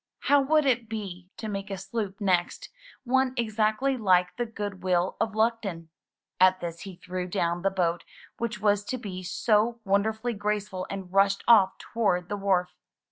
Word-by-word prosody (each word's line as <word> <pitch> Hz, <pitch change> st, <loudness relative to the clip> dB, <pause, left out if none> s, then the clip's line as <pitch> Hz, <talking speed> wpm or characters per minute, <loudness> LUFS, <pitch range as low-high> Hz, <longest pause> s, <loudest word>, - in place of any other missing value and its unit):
How 285 Hz, 0 st, +4 dB
would 305 Hz, +2 st, +3 dB
it 240 Hz, -4 st, +1 dB
be 190 Hz, -5 st, -6 dB
to 220 Hz, -, -5 dB
make 195 Hz, -1 st, -4 dB
a 195 Hz, -, -4 dB
sloop 195 Hz, +1 st, -4 dB
next 185 Hz, -4 st, 0 dB, 0.2 s
— -, -, -23 dB
one 260 Hz, 0 st, +1 dB
exactly 225 Hz, +4 st, +1 dB
like 180 Hz, -5 st, +3 dB
the 240 Hz, -1 st, -2 dB
"Goodwill 190 Hz, -4 st, -1 dB
of 220 Hz, -1 st, -1 dB
Luckton"? 220 Hz, -7 st, -1 dB, 0.5 s
At 185 Hz, 0 st, +5 dB
this 170 Hz, -1 st, -5 dB
he 195 Hz, -1 st, -8 dB
threw 180 Hz, 0 st, -5 dB
down 175 Hz, -2 st, -1 dB
the 195 Hz, -, +2 dB
boat 175 Hz, -3 st, -1 dB, 0.4 s
which 230 Hz, -3 st, -3 dB
was 205 Hz, 0 st, +2 dB
to 255 Hz, -, -3 dB
be 195 Hz, -6 st, -6 dB
so 215 Hz, +5 st, +1 dB
wonder 200 Hz, +2 st, +2 dB
fully 225 Hz, +2 st, -4 dB
graceful 205 Hz, -2 st, -3 dB
and 190 Hz, -2 st, -7 dB
rushed 195 Hz, 0 st, +3 dB
off 205 Hz, -5 st, +6 dB
toward 180 Hz, -6 st, -1 dB
the 205 Hz, -, -2 dB
wharf. 185 Hz, -3 st, +1 dB
200 Hz, 175 wpm, -27 LUFS, 185-225 Hz, 0.5 s, off